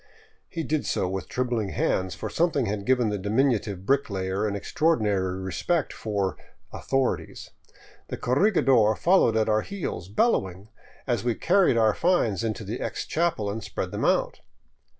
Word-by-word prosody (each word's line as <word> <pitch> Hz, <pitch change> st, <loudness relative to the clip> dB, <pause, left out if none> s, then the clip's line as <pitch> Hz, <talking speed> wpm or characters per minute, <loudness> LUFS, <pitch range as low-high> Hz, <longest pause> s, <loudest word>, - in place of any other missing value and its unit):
He 165 Hz, -, -4 dB
did 155 Hz, -1 st, -1 dB
so 95 Hz, -, 0 dB
with 95 Hz, -1 st, -4 dB
trembling 120 Hz, -5 st, -1 dB
hands, 95 Hz, -1 st, -1 dB
for -, -, -5 dB
something 160 Hz, -6 st, +1 dB
had 100 Hz, -1 st, -3 dB
given 125 Hz, -3 st, +3 dB
the 105 Hz, -1 st, -2 dB
dimin 115 Hz, +8 st, +2 dB
utive 100 Hz, -4 st, -4 dB
bricklayer 100 Hz, -6 st, 0 dB
an 100 Hz, -, -2 dB
extraordinary 100 Hz, -, 0 dB
respect 135 Hz, -, -1 dB
for 100 Hz, -4 st, -2 dB, 0.2 s
" -, -, -36 dB
authorities." 135 Hz, -1 st, -2 dB, 0.6 s
The -, -, -5 dB
corregidor 130 Hz, -, +3 dB
followed 170 Hz, -, +3 dB
at 110 Hz, -, +2 dB
our 110 Hz, 0 st, +2 dB
heels, 180 Hz, -, -5 dB
bellowing, 100 Hz, -, 0 dB, 0.4 s
as -, -, -1 dB
we 120 Hz, -2 st, 0 dB
carried 185 Hz, -8 st, +3 dB
our 110 Hz, -2 st, +4 dB
finds 120 Hz, -, +1 dB
into 110 Hz, 0 st, -3 dB
the 110 Hz, +4 st, -5 dB
ex -, -, -3 dB
chapel 165 Hz, -10 st, 0 dB
and 110 Hz, +1 st, -5 dB
spread 105 Hz, -, -4 dB
them -, -, -3 dB
out. -, -, +1 dB
110 Hz, 160 wpm, -26 LUFS, 100-140 Hz, 0.6 s, our